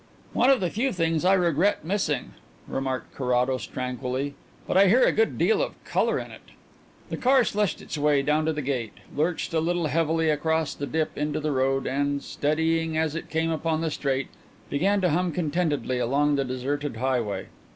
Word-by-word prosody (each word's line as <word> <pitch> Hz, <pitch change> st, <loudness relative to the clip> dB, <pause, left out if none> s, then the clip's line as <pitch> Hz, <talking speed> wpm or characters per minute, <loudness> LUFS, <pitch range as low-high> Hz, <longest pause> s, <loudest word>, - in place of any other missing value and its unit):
"One 250 Hz, -, +4 dB
of 270 Hz, -6 st, +4 dB
the 180 Hz, -3 st, 0 dB
few 255 Hz, +5 st, 0 dB
things 165 Hz, -3 st, 0 dB
I 185 Hz, +1 st, +5 dB
regret 175 Hz, -1 st, +2 dB
missing," 195 Hz, +3 st, -1 dB, 0.4 s
remarked 130 Hz, -1 st, -3 dB
Carrados 125 Hz, 0 st, 0 dB
tranquilly; 130 Hz, +2 st, -3 dB, 0.3 s
"but -, -, -2 dB
I 195 Hz, +1 st, +7 dB
hear 240 Hz, +7 st, +5 dB
a -, -, +5 dB
good 225 Hz, +1 st, +1 dB
deal 445 Hz, -, +3 dB
of -, -, -2 dB
colour -, -, +1 dB
in -, -, -6 dB
it." -, -, -12 dB, 0.7 s
The -, -, -2 dB
car 260 Hz, 0 st, +4 dB
slushed 210 Hz, -3 st, -1 dB
its 155 Hz, -, -5 dB
way 145 Hz, -1 st, +3 dB
down 150 Hz, +2 st, +1 dB
to 160 Hz, -, +2 dB
the 150 Hz, -1 st, -3 dB
gate, 125 Hz, -5 st, -2 dB, 0.2 s
lurched 165 Hz, +3 st, -1 dB
a 160 Hz, -, +3 dB
little 170 Hz, +1 st, 0 dB
heavily 160 Hz, +1 st, +1 dB
across 160 Hz, +1 st, 0 dB
the 140 Hz, -, -5 dB
dip 160 Hz, +1 st, -1 dB
into 150 Hz, +1 st, -1 dB
the 155 Hz, 0 st, -1 dB
road, 135 Hz, 0 st, +1 dB
and, 140 Hz, +1 st, -1 dB
steadying 160 Hz, +2 st, 0 dB
as 160 Hz, -2 st, +1 dB
it 165 Hz, -, -6 dB
came 165 Hz, +1 st, 0 dB
upon 160 Hz, 0 st, -1 dB
the 165 Hz, -1 st, -1 dB
straight, 135 Hz, -2 st, -1 dB, 0.4 s
began 195 Hz, +8 st, +2 dB
to 180 Hz, -, +3 dB
hum 175 Hz, +3 st, +1 dB
contentedly 150 Hz, -6 st, -1 dB
along 140 Hz, +5 st, +2 dB
the 140 Hz, -1 st, 0 dB
deserted 135 Hz, +1 st, -3 dB
highway. 125 Hz, -4 st, -1 dB
155 Hz, 190 wpm, -26 LUFS, 140-170 Hz, 0.7 s, I